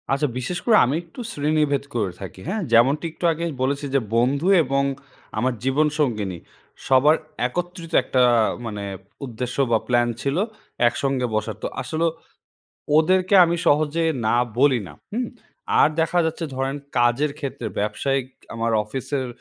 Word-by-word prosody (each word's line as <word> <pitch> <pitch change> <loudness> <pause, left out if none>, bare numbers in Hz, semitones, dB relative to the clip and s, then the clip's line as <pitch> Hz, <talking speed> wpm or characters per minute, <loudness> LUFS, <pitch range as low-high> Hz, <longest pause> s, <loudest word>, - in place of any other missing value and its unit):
আচ্ছা, 140 +2 +1
বিশেষ 150 +8 -3
করে 225 -3 +6
আমি 130 +4 0
একটু 170 +9 -15
শ্রেণীভেদ 150 -2 +1
করে 105 -5 0
থাকি, 95 -1 -8
হ্যাঁ। 215 +3 -1
যেমনটি 135 +8 +4
একটু 175 - -5
আগেই 170 +1 -3
বলেছি 140 +2 0
যে - - +5 0.2
বন্ধু 135 +8 +2 0.2
এবং 135 0 0 0.5
আমার 125 +3 +1
জীবন 135 +4 +2
সঙ্গিনী 105 - 0 0.5
সবার 135 +4 +5 0.3
একত্রিত 175 +3 -5
একটা 130 0 +1 0.4
মানে 105 -2 -5 0.4
উদ্দেশ্য 125 0 -5
বা 115 - +5
প্ল্যান 120 -1 +3
ছিল 140 +3 -1 0.5
একসঙ্গে 135 +1 0
বসার। 110 0 -2
তো - - 0
আসলে 160 +5 -1 0.9
ওদেরকে 185 +4 +3
আমি 170 0 0
সহজে 155 +2 +2 0.2
না 120 - +3 0.2
বলি 135 -3 +4
না, 75 - -11 0.2
হুম। 240 +3 -2 0.5
আর - - +7
দেখা 170 +2 +1
যাচ্ছে 165 +1 -2
ধরেন 135 +1 -1 0.2
কাজের 120 +5 +2
ক্ষেত্রে 135 -5 -4
ব্যবসায়িক 135 +5 -1 0.3
আমার 115 0 -1
অফিসের 130 +4 -3
135 Hz, 145 wpm, -23 LUFS, 120-155 Hz, 0.9 s, আর